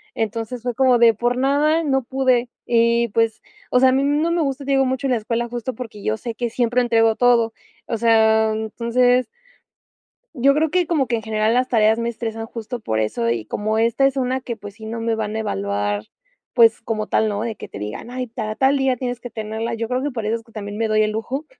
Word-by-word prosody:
Entonces, 225 Hz, +2 st, -3 dB
fue 245 Hz, -1 st, -2 dB
como 255 Hz, -2 st, +4 dB
de 230 Hz, -1 st, +6 dB
por 240 Hz, +3 st, 0 dB
nada, 295 Hz, +5 st, +2 dB
no 270 Hz, -4 st, +1 dB
pude 255 Hz, -1 st, +1 dB, 0.2 s
y, 235 Hz, 0 st, +3 dB
pues, 225 Hz, +1 st, 0 dB, 0.3 s
o 250 Hz, -, +4 dB
sea, 260 Hz, -, +6 dB
a -, -, +3 dB
mí, 270 Hz, +1 st, +2 dB
mm, 290 Hz, +1 st, +1 dB
no 335 Hz, -, +1 dB
me 340 Hz, -1 st, +1 dB
gusta, 275 Hz, 0 st, -3 dB
te 275 Hz, -, -3 dB
digo, 270 Hz, -1 st, +3 dB
mucho 260 Hz, +2 st, -1 dB
la 255 Hz, -, +2 dB
escuela, 230 Hz, +2 st, -2 dB
justo 245 Hz, +1 st, -4 dB
porque 220 Hz, -3 st, -9 dB
yo 110 Hz, 0 st, 0 dB
sé 230 Hz, -2 st, -6 dB
que 240 Hz, -1 st, -2 dB
siempre 245 Hz, +1 st, +1 dB
entrego 225 Hz, -2 st, +3 dB
todo. 235 Hz, -2 st, +3 dB, 0.4 s
O 230 Hz, -, -2 dB
sea, 220 Hz, -1 st, +4 dB
entonces 240 Hz, +3 st, +1 dB, 1.1 s
Yo 275 Hz, +3 st, +3 dB
creo 310 Hz, 0 st, +1 dB
que 360 Hz, -1 st, +1 dB
como 300 Hz, -6 st, +1 dB
que 240 Hz, -, -1 dB
en 225 Hz, -, -3 dB
general 215 Hz, +1 st, 0 dB
las 255 Hz, +1 st, +2 dB
tareas 220 Hz, -1 st, +3 dB
me 235 Hz, 0 st, -1 dB
estresan 225 Hz, -1 st, -5 dB
justo 230 Hz, +2 st, -6 dB
por 110 Hz, -, -2 dB
eso, 115 Hz, +2 st, -1 dB
y 115 Hz, -2 st, -1 dB
como 215 Hz, -, -2 dB
esta 230 Hz, +4 st, +3 dB
es 275 Hz, 0 st, -3 dB
una 260 Hz, 0 st, 0 dB
que, 235 Hz, -2 st, -5 dB
pues, 205 Hz, -2 st, -10 dB
si 220 Hz, 0 st, -11 dB
no 230 Hz, +1 st, -4 dB
me 230 Hz, 0 st, 0 dB
van 220 Hz, -1 st, -3 dB
a -, -, -1 dB
evaluar, 100 Hz, -, -2 dB, 0.5 s
pues 225 Hz, -1 st, +5 dB
como 220 Hz, -2 st, -2 dB
tal, 220 Hz, -, +1 dB
¿no?, 205 Hz, +1 st, -2 dB
de 225 Hz, -2 st, -3 dB
que -, -, -9 dB
te -, -, -10 dB
digan: 105 Hz, -, -6 dB
"Ay, 255 Hz, 0 st, -4 dB
ta 220 Hz, -2 st, -5 dB
tal 270 Hz, +3 st, +3 dB
día 265 Hz, -1 st, +2 dB
tienes 245 Hz, -1 st, -3 dB
que 245 Hz, -, -8 dB
tenerla". 220 Hz, +1 st, -4 dB
Yo 230 Hz, 0 st, -3 dB
creo 255 Hz, +1 st, -1 dB
que 290 Hz, -, -1 dB
por 230 Hz, -4 st, -5 dB
eso 220 Hz, +2 st, 0 dB
es 225 Hz, -, -14 dB
que 230 Hz, -, -22 dB
también 205 Hz, -1 st, -6 dB
me 225 Hz, -, +1 dB
doy 215 Hz, 0 st, +3 dB
el 215 Hz, -, 0 dB
lujo 255 Hz, +7 st, -4 dB
230 Hz, 245 wpm, -21 LUFS, 220-255 Hz, 1.1 s, de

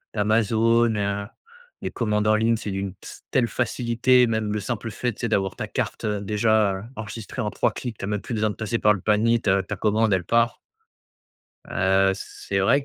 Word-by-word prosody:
d'Amazon, 115 Hz, +2 st, +3 dB
heu, 100 Hz, 0 st, -2 dB, 0.6 s
les -, -, -1 dB
commandes 105 Hz, -2 st, 0 dB
en 110 Hz, -, +5 dB
ligne, 115 Hz, +1 st, +2 dB
c'est 105 Hz, -, -5 dB
d'une 95 Hz, -1 st, -3 dB
s -, -, -11 dB
telle 120 Hz, -2 st, +3 dB
facilité. 120 Hz, +2 st, +2 dB
Même 110 Hz, -2 st, -1 dB
le 105 Hz, -, -1 dB
simple 115 Hz, +2 st, -4 dB
fait, 120 Hz, 0 st, -2 dB
tu -, -, -12 dB
sais? 120 Hz, -, -1 dB
D'avoir 95 Hz, -3 st, 0 dB
ta -, -, -4 dB
carte, -, -, -3 dB
heu, 105 Hz, -1 st, -1 dB
déjà 105 Hz, -1 st, +1 dB
enregistrée 110 Hz, +3 st, -6 dB
en 105 Hz, -, -1 dB
3 -, -, +1 dB
clics. 120 Hz, -4 st, -6 dB
Tu -, -, -5 dB
as -, -, -5 dB
même 105 Hz, -1 st, -1 dB
plus 125 Hz, -, -6 dB
besoin 110 Hz, 0 st, +1 dB
de -, -, -9 dB
passer 115 Hz, +1 st, -2 dB
par 105 Hz, -, +5 dB
le 100 Hz, -, -5 dB
panier. 110 Hz, +3 st, +3 dB
Ta 95 Hz, -1 st, +2 dB
ta 105 Hz, -, -5 dB
commande, 110 Hz, 0 st, +2 dB
elle 95 Hz, -, +1 dB
part. 115 Hz, 0 st, +2 dB, 1.1 s
Heu, 95 Hz, +1 st, +2 dB
c'est 100 Hz, 0 st, -5 dB
vrai 140 Hz, +8 st, +3 dB
110 Hz, 205 wpm, -24 LUFS, 100-115 Hz, 1.1 s, en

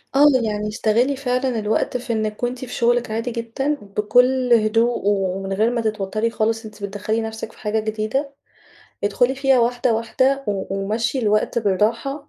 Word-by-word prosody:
آه. 285 Hz, +2 st, +6 dB, 0.2 s
يعني 210 Hz, -1 st, -2 dB
استغلّي 225 Hz, +5 st, +1 dB
فعلًا 255 Hz, -2 st, -1 dB
الوقت 215 Hz, +4 st, 0 dB
في 240 Hz, -1 st, -4 dB
إنِّك 215 Hz, 0 st, -3 dB
وأنتِ 245 Hz, +1 st, -1 dB
في 245 Hz, -, -9 dB
شغلِك 240 Hz, -1 st, +1 dB
عادي 230 Hz, +2 st, -2 dB
جدًا، 235 Hz, +5 st, -2 dB, 0.2 s
بكل 250 Hz, +4 st, +3 dB
هدوء 225 Hz, +2 st, +2 dB
ومن 195 Hz, -1 st, 0 dB
غير 215 Hz, +4 st, +2 dB
ما 235 Hz, -1 st, -1 dB
تتوتّري 215 Hz, +1 st, -1 dB
خالص 225 Hz, 0 st, -1 dB
أنتِ 215 Hz, -1 st, -11 dB
بتدخلي 205 Hz, +3 st, -2 dB
نفسِك 220 Hz, 0 st, -6 dB
في -, -, -20 dB
حاجة 215 Hz, +1 st, -1 dB
جديدة، 220 Hz, +6 st, -2 dB, 0.7 s
ادخُلي 245 Hz, +6 st, +2 dB
فيها 270 Hz, -1 st, +3 dB
واحدة، 240 Hz, 0 st, +1 dB
واحدة 260 Hz, +5 st, +1 dB
و 195 Hz, -1 st, -2 dB
ومشّي 225 Hz, +6 st, -1 dB
الوقت 215 Hz, 0 st, +1 dB
بالراحة 230 Hz, +8 st, 0 dB
225 Hz, 160 wpm, -21 LUFS, 215-245 Hz, 0.7 s, آه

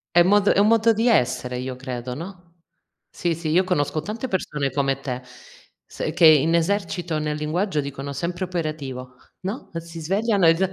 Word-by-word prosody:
È -, -, +8 dB
un 175 Hz, -, +4 dB
mod 205 Hz, 0 st, +4 dB
è -, -, +4 dB
un 205 Hz, -, +5 dB
modo 230 Hz, 0 st, +4 dB
di 225 Hz, +3 st, +1 dB
essere 125 Hz, -, +1 dB
io 130 Hz, 0 st, -4 dB
credo, 125 Hz, -1 st, -5 dB
no. 180 Hz, +3 st, -9 dB, 0.6 s
Sì, 170 Hz, -2 st, -1 dB
sì, 160 Hz, -1 st, -4 dB
io 180 Hz, +4 st, +4 dB
conosco 155 Hz, -4 st, 0 dB
tante 225 Hz, +9 st, -5 dB
persone 150 Hz, -, -2 dB
come 135 Hz, -1 st, 0 dB
te, 125 Hz, -2 st, -4 dB, 0.6 s
se -, -, -4 dB
che 165 Hz, -, +4 dB
in 155 Hz, +1 st, +6 dB
esercito 175 Hz, -2 st, 0 dB
nel 150 Hz, 0 st, -2 dB
linguaggio 155 Hz, +2 st, -1 dB
dicono: 140 Hz, 0 st, -6 dB
"Sempre 175 Hz, +6 st, -3 dB
operativo", 145 Hz, -7 st, -5 dB, 0.3 s
no. 200 Hz, +8 st, -5 dB
Si 165 Hz, 0 st, -6 dB
svegliano 195 Hz, +2 st, +2 dB
e 165 Hz, -, +6 dB
già 190 Hz, +2 st, 0 dB
165 Hz, 185 wpm, -23 LUFS, 140-190 Hz, 0.6 s, È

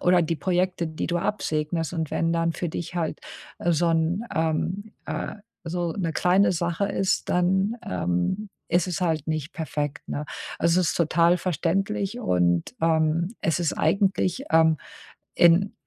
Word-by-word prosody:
oder 180 Hz, 0 st, +4 dB
die 165 Hz, 0 st, -1 dB
Projekte, 180 Hz, -1 st, 0 dB
die 155 Hz, 0 st, -4 dB
du 175 Hz, -, 0 dB
absegnest. 165 Hz, -3 st, -1 dB
Und 160 Hz, -3 st, -2 dB
wenn 165 Hz, 0 st, 0 dB
dann 165 Hz, 0 st, +1 dB
für 175 Hz, -, -3 dB
dich 170 Hz, +2 st, -5 dB
halt, 165 Hz, -3 st, -2 dB, 0.4 s
äh, 175 Hz, -, +1 dB
so 170 Hz, +2 st, +2 dB
'n 165 Hz, +6 st, +1 dB
ähm, 170 Hz, +6 st, -1 dB
äh, -, -, -4 dB, 0.3 s
so 170 Hz, 0 st, -2 dB
'ne 165 Hz, -3 st, -2 dB
kleine 180 Hz, +3 st, +3 dB
Sache 170 Hz, +3 st, -1 dB
ist, 195 Hz, -1 st, 0 dB
dann, 190 Hz, +5 st, +2 dB
ähm, 90 Hz, -, -1 dB, 0.2 s
ist 175 Hz, +1 st, +2 dB
es 175 Hz, -4 st, -3 dB
halt 160 Hz, -4 st, 0 dB
nicht 155 Hz, 0 st, -3 dB
perfekt, 150 Hz, -3 st, -4 dB
ne? 150 Hz, -, -3 dB, 0.3 s
Also, 170 Hz, +2 st, +3 dB
es 175 Hz, -, +1 dB
ist -, -, -3 dB
total 170 Hz, +1 st, +3 dB
verständlich 195 Hz, -, -1 dB
und, 85 Hz, -, +1 dB
ähm, 165 Hz, +4 st, +2 dB
es 165 Hz, +1 st, +1 dB
ist 170 Hz, -3 st, 0 dB
eigentlich, 195 Hz, +2 st, +1 dB
ähm, 160 Hz, -1 st, +5 dB, 0.6 s
in 175 Hz, +4 st, +5 dB
170 Hz, 160 wpm, -25 LUFS, 160-185 Hz, 0.6 s, ähm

